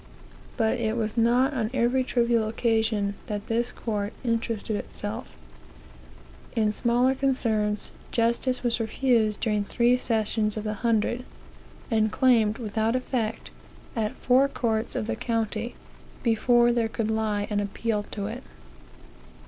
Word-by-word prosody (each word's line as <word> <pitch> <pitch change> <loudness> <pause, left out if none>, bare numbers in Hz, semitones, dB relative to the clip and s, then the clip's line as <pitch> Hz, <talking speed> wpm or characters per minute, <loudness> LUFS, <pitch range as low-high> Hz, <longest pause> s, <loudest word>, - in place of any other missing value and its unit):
But 225 +1 +1
it 225 0 0
was 220 -1 -2
not 245 +4 +3
on 225 -5 -1
every 250 +1 +2
trivial 235 -3 +1
occasion 220 -3 +1
that 205 -1 -4
this 235 +2 0
court 210 -2 -3
interested 230 -2 -1
itself. 60 - -6 1.2
In 215 -2 +2
smaller 245 +4 +2
concerns, 225 -6 0 0.2
justice 235 +2 +1
was 240 -1 +1
refused 225 -2 +1
during 210 -2 +1
three 240 +4 +3
sessions 220 -2 0
of 215 - -3
the 215 -1 -2
hundred, 235 +1 +1 0.7
and 220 -1 +2
claimed 225 -5 +3
without 220 0 -1
effect, 235 -3 -2 0.4
at 220 -2 -1
four 255 +2 +4
courts 225 -4 -1
of - - -1
the - - -2
county, 225 0 -2 0.5
before 240 +1 +4
there 235 -2 +1
could 220 -1 -2
lie 215 -2 0
an 205 - +1
appeal 210 +1 -1
to 200 -2 -4
it. 230 +5 -5
225 Hz, 130 wpm, -26 LUFS, 215-240 Hz, 1.2 s, four